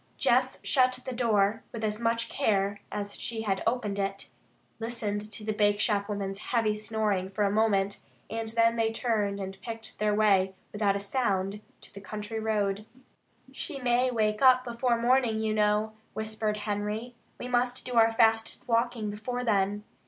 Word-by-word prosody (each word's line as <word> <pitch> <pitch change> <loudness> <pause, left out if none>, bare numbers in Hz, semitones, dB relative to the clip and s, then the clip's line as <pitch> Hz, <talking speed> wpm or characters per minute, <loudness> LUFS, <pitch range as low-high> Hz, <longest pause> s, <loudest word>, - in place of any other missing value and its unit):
Jess - - +2
shut 255 -2 +3
the 255 - -4
door 220 -3 +2
with 225 -2 -6
as 210 0 -1
much 230 0 +1
care 200 -6 0
as 205 -1 -4
she 225 -2 -3
had 195 -3 0
opened 220 -4 0
it, 195 0 -3 0.5
listened 215 -2 -3
to 210 +1 -7
the 215 0 -1
bakeshop 205 0 +2
woman's 195 -1 -3
heavy 225 -3 +1
snoring 210 -3 -1
for 195 +2 -1
a 200 - +2
moment, 200 -2 +2 0.3
and 225 0 -4
then 230 +1 +2
they 225 -1 +2
turned 215 -4 0
and 195 0 -6
picked 225 -2 -8
their 210 0 +2
way 195 -3 +3 0.2
without 205 -1 +1
a - - -1
sound 200 -2 -1 0.2
to - - -13
the 200 - -9
country 210 +2 -5
road. 210 -1 -1 0.6
"She 280 - -5
may 250 0 +2
wake 215 -3 0
up 255 -1 +6
before 240 0 0
morning, 240 -2 +3
you 220 -1 0
know," 210 +1 +2 0.2
whispered 220 -1 -2
Henry. 210 +3 -3 0.3
"We 245 - -5
must 245 0 0
do 250 - -4
our 225 -1 +5
fastest 225 +3 +2
walking 230 -2 0
before 245 +4 -4
then. 205 -2 +1
215 Hz, 165 wpm, -28 LUFS, 205-230 Hz, 0.6 s, up